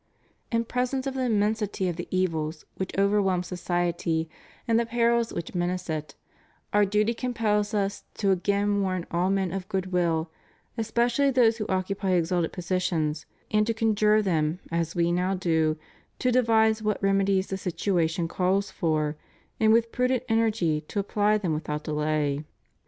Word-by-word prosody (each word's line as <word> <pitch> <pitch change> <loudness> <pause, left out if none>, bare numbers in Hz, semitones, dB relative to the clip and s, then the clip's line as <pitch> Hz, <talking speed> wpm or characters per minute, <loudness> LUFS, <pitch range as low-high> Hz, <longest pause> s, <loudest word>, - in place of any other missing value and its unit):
In 230 0 +1
presence 250 +3 -1
of 270 - -2
the 260 -1 -1
immensity 210 -3 0
of 175 - -2
the 175 - -6
evils 165 -4 -1
which 190 - -4
over 200 +1 +3
whelm 185 -2 +1
society 175 -2 -1 0.4
and 230 0 +3
the 235 - +1
perils 235 0 +2
which 170 - -5
menace 180 -1 -2
it, 155 -2 -4 0.6
Our 205 0 +5
duty 210 +3 +1
compels 220 -4 0
Us 200 0 -1
to 200 -2 +1
again 200 +2 +1
warn 185 -3 -1
all 175 +2 +1
men 195 -2 0
of 195 +1 -5
good 190 -2 -2
will, 165 -2 0 0.4
especially 235 +4 +1
those 240 -4 +4
who 215 - -3
occupy 190 0 -1
exalted 175 -1 +1
positions, 175 -4 -1 0.2
and 210 0 +3
to 230 - 0
conjure 215 -1 +3
them 160 -3 0
as 165 +1 -1
We 170 0 +2
now 180 +2 +1
do, 160 -4 +1 0.4
to 250 - +1
devise 220 -3 +3
what 210 -1 0
remedies 195 -1 +2
the 190 - -2
situation 170 -2 0
calls 190 +3 0
for 155 -3 -1 0.4
and 220 -1 +4
with 230 0 +3
prudent 250 -1 +1
energy 220 -9 +1
to 205 - -3
apply 205 +1 +2
them 180 -6 -1
without 150 0 -3
delay. 150 -1 -1
195 Hz, 160 wpm, -26 LUFS, 170-220 Hz, 0.6 s, Our